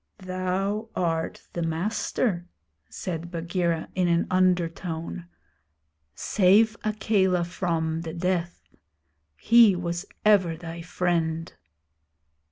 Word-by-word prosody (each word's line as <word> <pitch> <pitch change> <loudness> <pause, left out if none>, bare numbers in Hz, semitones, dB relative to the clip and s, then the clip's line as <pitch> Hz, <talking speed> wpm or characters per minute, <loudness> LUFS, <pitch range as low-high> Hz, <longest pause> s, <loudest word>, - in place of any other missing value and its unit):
'Thou 190 +3 -2
art 165 -2 -2
the 170 - -3
master,' 175 +2 -1 0.4
said 170 -2 -5
Bagheera, 170 -1 -1
in 180 -1 +1
an 170 0 +2
undertone. 170 - 0 0.9
'Save 215 +3 +4
Akela 205 -4 +1
from, 165 -2 -2
the 165 -1 -5
death. 175 0 -2 0.7
He 230 -4 +6
was 175 +1 -3 0.2
ever 185 -6 +4
thy 165 +1 -7
friend.' 165 -2 -1
175 Hz, 90 wpm, -26 LUFS, 165-190 Hz, 0.9 s, He